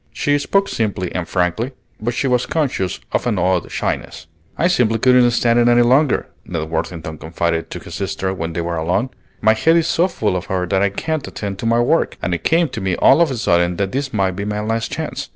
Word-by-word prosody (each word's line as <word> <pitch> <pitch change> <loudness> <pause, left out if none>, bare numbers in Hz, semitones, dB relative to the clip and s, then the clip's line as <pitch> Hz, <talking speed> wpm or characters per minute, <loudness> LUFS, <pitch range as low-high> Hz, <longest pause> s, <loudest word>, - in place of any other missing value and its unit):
She 145 0 +1
spoke 195 +7 +1
simply 100 - -2
and 90 -2 -3
frankly, 95 +8 -1 0.3
but 120 +2 -2
she 135 - -1
was 125 -2 +1
conscious 130 - -1
of - - 0
an 110 -4 0
odd 90 0 0
shyness. 80 - -3 0.3
"I 170 - +3
simply 125 -10 +2
couldn't 125 +1 +5
stand 120 0 +2
it 120 - +4
any 120 0 +5
longer," 130 +4 +3 0.2
Ned 80 -1 -5
Worthington 80 -1 -4
confided 80 +1 -2
to - - -6
his - - -11
sister 95 0 -2
when 80 -3 -4
they 85 - -2
were 85 0 -3
alone. 90 +11 0 0.3
"My 110 0 +5
head 160 +9 +3
is 165 - +2
so 170 +2 +2
full 110 - -1
of 90 - -3
her 90 -1 -1
that 95 +2 0
I 100 - +3
can't 155 +9 -3
attend 100 -2 -5
to 115 - -2
my 115 +1 +3
work, 120 - +1
and 90 - -2
it 85 - -3
came 165 +1 +3
to 110 - -6
me 95 -2 0
all 170 - +5
of 170 - +4
a 130 - -3
sudden 85 -4 +2
that 100 -1 -1
this 135 +1 -2
might 95 -3 +1
be 95 +2 -5
my 105 0 -2
last 115 +1 -2
chance. - - -4
105 Hz, 235 wpm, -19 LUFS, 90-125 Hz, 0.3 s, couldn't